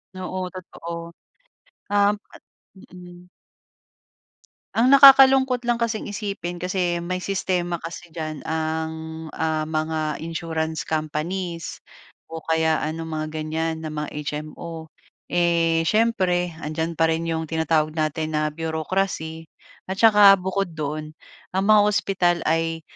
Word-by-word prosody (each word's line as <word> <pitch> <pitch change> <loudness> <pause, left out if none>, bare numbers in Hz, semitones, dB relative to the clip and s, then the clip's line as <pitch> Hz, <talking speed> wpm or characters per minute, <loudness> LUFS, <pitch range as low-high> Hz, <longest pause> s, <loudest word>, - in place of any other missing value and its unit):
Oo, 185 0 -4
totoo. 170 -2 -7 0.8
Uhm 205 0 +3 0.8
mm. 180 0 -13 1.5
Ang 235 +3 +4
nakakalungkot 265 -2 +7
lang 240 - +3
kasing 230 -3 -2
isipin 200 -4 -4
kasi 180 -1 -1
may 185 +2 -3
sistema 180 -3 -1
kasi 170 +1 -9
diyan 155 -2 -5
ang, 160 0 -4
ah, 155 -1 -2
mga 155 -1 -1
insurance 160 -1 -3
companies 165 +2 -3 0.5
o 165 0 -8
kaya 160 0 +1
ano, 160 +3 -3
mga 155 -1 -4
ganyan 160 +1 -3
na 155 - -5
mga 150 -1 -3
HMO. 155 +2 -6 0.4
Eh, 165 -1 +2
siyempre, 185 -6 +1
andiyan 160 +1 -3
pa 165 - +4
rin 160 0 +1
'yong 160 -1 -2
tinatawag 160 -1 0
natin 155 0 -2
na 155 0 +1
bureaucracy 160 +1 -3 0.4
at 190 - -3
saka 205 -1 +7
bukod 190 -1 -2
doon, 155 0 -4 0.4
ang 190 +1 +1
mga 215 -1 +7
ospital 185 -4 +2
ay 165 0 0
165 Hz, 120 wpm, -23 LUFS, 160-185 Hz, 1.5 s, nakakalungkot